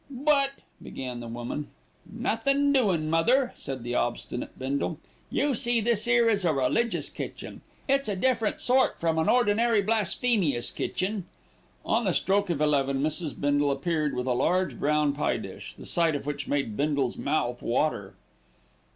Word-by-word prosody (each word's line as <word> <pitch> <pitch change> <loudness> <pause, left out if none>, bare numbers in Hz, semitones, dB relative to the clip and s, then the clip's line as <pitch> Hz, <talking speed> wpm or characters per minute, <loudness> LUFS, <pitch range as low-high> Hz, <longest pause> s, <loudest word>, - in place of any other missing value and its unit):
"But 275 +1 +2 0.2
" - - -35
began 125 -2 -6
the 120 - -7
woman. 120 +5 -5 0.4
"Nothin', 275 +6 +1
doin' 190 - +2
mother," 245 - +2
said 130 -3 -6
the 120 0 -3
obstinate 120 0 -3
Bindle. 140 +4 -2 0.3
"You 285 -1 +1
see 240 0 +1
this 225 0 +1
'ere 240 -1 +4
is 205 -3 +2
a 170 - +3
religious 145 - 0
kitchen. - - -7 0.3
It's 275 -3 +1
a 200 - -1
different 230 +1 0
sort 260 +1 +3
from 165 -1 +1
an 160 - +1
ordinary 230 -2 +3
blasphemious 205 - +1
kitchen." 190 0 -2 0.6
On 230 +1 +1
the 185 - +1
stroke 200 0 +1
of 160 -4 -1
eleven 140 -2 +2
Mrs. 155 0 -3
Bindle 145 0 +2
appeared 150 +1 -1
with 125 0 -2
a 130 - +1
large 180 +9 0
brown 150 0 +2
pie 145 - 0
dish, - - -9
the - - -11
sight 165 -3 +1
of 140 - -4
which 145 -1 -4
made 140 -7 -1
Bindle's 140 -3 0
mouth 125 -4 -1
water. 115 -6 -1
165 Hz, 160 wpm, -27 LUFS, 140-230 Hz, 0.6 s, ere